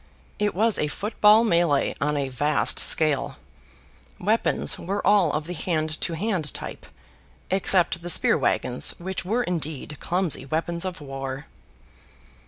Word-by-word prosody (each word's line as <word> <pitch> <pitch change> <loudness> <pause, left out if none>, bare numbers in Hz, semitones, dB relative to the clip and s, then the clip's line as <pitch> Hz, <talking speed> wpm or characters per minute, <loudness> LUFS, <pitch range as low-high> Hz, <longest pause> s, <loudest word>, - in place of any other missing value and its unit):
It 210 -2 0
was 220 +3 +2
a 150 - 0
foot 210 +8 -6
ball 215 +2 +7
melee 170 -8 +2
on 150 +1 0
a 140 -2 -2
vast 145 +4 0
scale. 140 -3 +2 0.8
Weapons 215 +5 0
were 200 +3 -4
all 195 -5 +4
of 150 +1 -3
the 175 - -5
hand 155 -2 -3
to 170 - -2
hand 175 -3 -2
type, - - -7 0.6
except 185 -2 +3
the 175 - -4
spear - - +5
wagons 125 0 0
which 190 +2 -5
were 225 +7 0
indeed 155 - -4
clumsy 180 -6 -1
weapons 165 +5 -2
of 185 -3 -5
war. 135 -1 -6
170 Hz, 145 wpm, -24 LUFS, 150-190 Hz, 0.8 s, ball